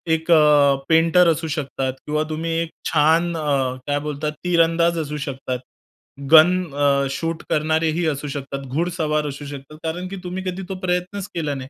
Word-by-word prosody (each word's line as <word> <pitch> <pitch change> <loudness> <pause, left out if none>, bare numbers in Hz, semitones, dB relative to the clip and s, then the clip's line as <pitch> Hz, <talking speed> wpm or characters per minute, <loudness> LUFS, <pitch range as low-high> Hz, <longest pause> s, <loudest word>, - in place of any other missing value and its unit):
एक 160 +2 -3
अ, 150 -3 +6
पेंटर 165 +2 +5
असू 160 +1 -3
शकतात 135 -4 -3
किंवा 150 +1 0
तुम्ही 160 +1 -3
एक 165 - -3 0.2
छान 165 +3 +3
अ, 140 -4 0
काय 145 0 +1
बोलतात 150 0 -3
तीरंदाज 170 -1 +2
असू 150 -1 -4
शकतात, 130 -2 -4 0.7
गन 175 +3 +7
अ, 140 -1 +2
शूट 165 +4 -3
करणारेही 160 +2 +1
असू 150 -1 -2
शकतात, 140 -1 -5
घुडसवार 155 +1 -1
असू 145 +1 -7
शकतात. 140 +1 -9
कारण 170 +3 -3
की 195 - -6
तुम्ही 185 +1 -5
कधी 185 0 -4
तो 190 - -3
प्रयत्नच 185 +2 -2
केला 155 -4 -1
नाही. 130 -1 -7
155 Hz, 165 wpm, -21 LUFS, 145-170 Hz, 0.7 s, गन